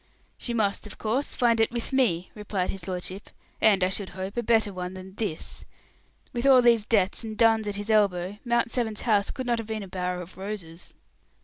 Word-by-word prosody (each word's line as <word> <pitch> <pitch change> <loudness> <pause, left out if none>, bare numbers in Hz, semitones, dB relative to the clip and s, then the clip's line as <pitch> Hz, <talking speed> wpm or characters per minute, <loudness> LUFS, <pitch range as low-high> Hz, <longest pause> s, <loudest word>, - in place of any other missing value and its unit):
"She 240 - -4
must, 210 -1 0
of 210 - -11
course, 240 +6 -1
find 235 -3 +3
it 225 - +4
with 235 +2 0
me," 185 -10 +1
replied 205 -3 -2
his 190 -3 -8
lordship; 185 +2 -5 0.3
"and, 200 -4 +5
I 185 - +3
should 195 0 -2
hope, 190 +1 -5
a 240 - 0
better 220 -3 +2
one 180 0 -5
than 190 0 -10
this. 200 -6 -5 0.7
With 240 +2 0
all 260 -2 +7
these 230 -3 +5
debts 210 -1 +1
and 220 -1 -6
duns 225 -1 +4
at 205 - -1
his 205 +2 -2
elbow, 200 -2 +2
Mount 235 -1 +1
Severn's 220 -4 -1
house 205 -4 +2
could 260 - -4
not 240 -1 +1
have 225 - -6
been 220 -2 -3
a - - -8
bower 180 -1 -3
of 180 0 -10
roses." 190 -4 -7
210 Hz, 210 wpm, -26 LUFS, 185-230 Hz, 0.7 s, all